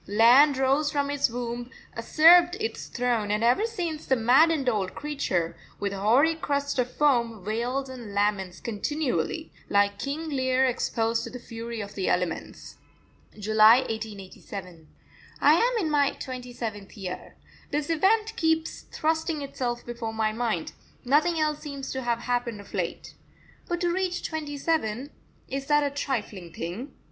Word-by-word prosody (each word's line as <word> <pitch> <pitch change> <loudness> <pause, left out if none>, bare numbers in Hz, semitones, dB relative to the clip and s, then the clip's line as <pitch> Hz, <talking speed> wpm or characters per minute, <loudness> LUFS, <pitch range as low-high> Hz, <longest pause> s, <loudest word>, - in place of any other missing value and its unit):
Land 245 +7 +6
rose 275 +3 +2
from 285 -1 0
its 285 -3 +1
womb, 240 0 -4 0.3
usurped 345 +9 +6
its 445 +1 -4
throne, 240 -4 -1
and 210 +2 0
ever 250 - +3
since 345 -9 -4
the 265 - +4
maddened 270 +5 +4
old 205 -6 0
creature, 195 - -2 0.2
with 200 -1 -2
hoary 235 +11 +3
crest 285 -3 -2
of 250 0 +1
foam, 235 -8 +1
wails 245 +5 -1
and 245 -5 -8
laments 200 -3 0
continually, 295 +7 -2 0.2
like 200 0 +2
King 300 +4 -3
Lear 260 -2 +2
exposed 230 -2 0
to - - -6
the 250 - -7
fury 230 -1 -6
of 205 0 -7
the 190 - -1
elements. 180 -2 -3 0.6
July 215 +3 +6
1887. 195 -6 -7 0.5
I 295 - +6
am 475 +8 +2
in 310 - -1
my 285 -2 +3
twenty 250 -2 -7
seventh 215 -4 -6
year. 185 -2 -7 0.3
This 295 +2 -1
event 430 +7 +2
keeps 320 -5 0
thrusting 320 -1 -1
itself 245 -3 -3
before 235 -2 -5
my 220 -1 +1
mind 220 -7 -2 0.3
nothing 310 +6 +3
else 305 -1 0
seems 280 -3 -6
to 265 - -3
have 235 -1 -1
happened 245 -3 -2
of 200 - -13
late. - - -3 0.6
But 345 -1 -1
to 350 -1 +2
reach 370 -1 -1
twenty 300 -3 -5
seven 275 -4 -1 0.4
is 275 +1 -4
that 295 0 +4
a 285 - 0
trifling 220 - -4
thing? 175 - -6
250 Hz, 155 wpm, -26 LUFS, 220-295 Hz, 0.6 s, Land